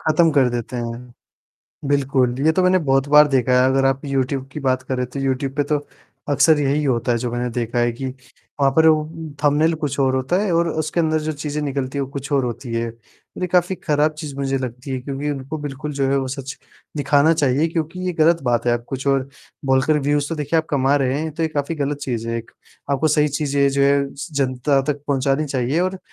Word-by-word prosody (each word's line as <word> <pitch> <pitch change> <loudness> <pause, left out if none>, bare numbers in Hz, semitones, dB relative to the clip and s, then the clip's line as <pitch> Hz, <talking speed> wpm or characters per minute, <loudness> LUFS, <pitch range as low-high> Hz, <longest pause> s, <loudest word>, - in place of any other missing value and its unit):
ख़त्म 165 +1 +3
कर 135 -3 +4
देते 120 +1 -4
हैं। 120 +1 -6 0.8
बिल्कुल, 135 -3 +2
ये 160 - +5
तो 185 - +1
मैंने 185 0 +4
बहुत 135 -3 +1
बार 150 +1 +7
देखा 130 -2 +1
है, 130 - +4
अगर 135 0 +2
आप 135 +2 0
यूट्यूब 135 -1 -1
की 150 - -5
बात 130 -2 0
करें 130 -1 -2
तो 130 +3 -6
यूट्यूब 135 0 -1
पे 145 - +3
तो 150 0 0 0.5
अक्सर 150 +2 +4
यही 145 +1 +1
होता 125 -2 +1
है 120 - +1
जो 120 +1 -3
मैंने 120 0 -1
देखा 120 0 -2
है 120 0 +2
कि, 130 +3 -5 0.5
वहाँ 135 -1 +4
पर 160 0 +6
वो 155 -1 +4
उ 160 0 -8
थंबनेल 150 +3 +3
कुछ 150 -4 -3
और 130 -1 +2
होता 130 +7 0
है। 210 - -1
और 170 0 +2
उसके 155 +1 -1
अंदर 160 -1 +1
जो 155 +1 -2
चीज़ें 150 0 -4
निकलती 140 -1 -3
हैं - - 0
वो - - -10
कुछ 140 0 -6
और 135 -2 +2
होती 120 0 -5
है। 115 0 -1
और 115 - -15
ये - - +1
काफ़ी 180 +1 +3
खराब 150 -2 +1
चीज़ 150 -3 -7
मुझे 135 -1 -1
लगती 125 +1 -6
है 130 - -1
क्योंकि 140 +2 -4
उनको 140 +2 -5
बिल्कुल 145 0 -5
जो 140 -1 0
है 140 - +2
वो 135 -1 -2
सच 135 0 -6 0.4
दिखाना 145 +2 +3
चाहिए, 145 +1 +2
क्योंकि 165 +2 -3
ये 180 - 0
ग़लत 165 0 +3
बात 120 -2 0
है 120 - +4
आप 120 0 -2
कुछ 135 +1 -5
और 135 -1 +1 0.4
बोलकर 135 +3 +3
व्यूज़ 145 +1 0
तो 165 - -2
देखिए 150 +1 -1
आप 160 - -1
कमा 140 -1 +2
रहे 135 +1 0
हैं, 160 - -3
तो 165 - -3
ये 160 - +1
काफ़ी 150 +1 -2
ग़लत 145 -1 -2
चीज़ 120 -5 -3
है 115 - -1
एक। 115 - -10 0.4
आपको 140 +3 +2
सही 150 0 +3
चीज़ें 140 -1 +1
जो 140 0 +1
है 140 0 +2
स 140 - -7
जनता 135 0 +1
तक 140 0 -13
पहुँचानी 135 +1 +1
चाहिए 135 +3 0
और 185 +1 -1
140 Hz, 235 wpm, -21 LUFS, 130-150 Hz, 0.8 s, बार